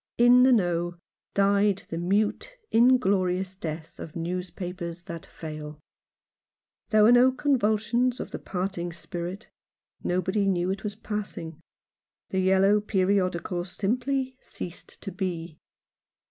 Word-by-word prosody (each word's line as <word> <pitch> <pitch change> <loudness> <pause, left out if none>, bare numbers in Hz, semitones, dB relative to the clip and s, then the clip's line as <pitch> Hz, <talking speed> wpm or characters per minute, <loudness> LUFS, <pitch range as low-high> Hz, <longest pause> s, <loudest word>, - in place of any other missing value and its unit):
In 245 +1 +7
the 260 +1 +6
Know 175 -5 +1 0.4
died 200 0 +3
the 165 - -3
mute, 205 - 0
inglorious 190 -6 +3
death 160 -3 -6
of 155 - -8
newspapers 175 0 -4
that 170 -2 -8
fail. 155 -1 -8 1.1
There 215 -2 +5
were 220 - +7
no 245 +2 +7
convulsions 245 -2 +1
of - - -5
the - - -5
parting 180 -2 -3
spirit. 175 +4 -6 0.5
Nobody 190 +3 +1
knew 180 -1 +1
it 195 0 -4
was 210 -1 -3
passing. 200 -7 -5 0.7
The 190 - +1
yellow 190 +2 +4
periodical 185 -3 0
simply 255 +7 -1
ceased 175 -1 -9
to 195 - -5
be. 175 -4 -4
190 Hz, 120 wpm, -27 LUFS, 175-215 Hz, 1.1 s, In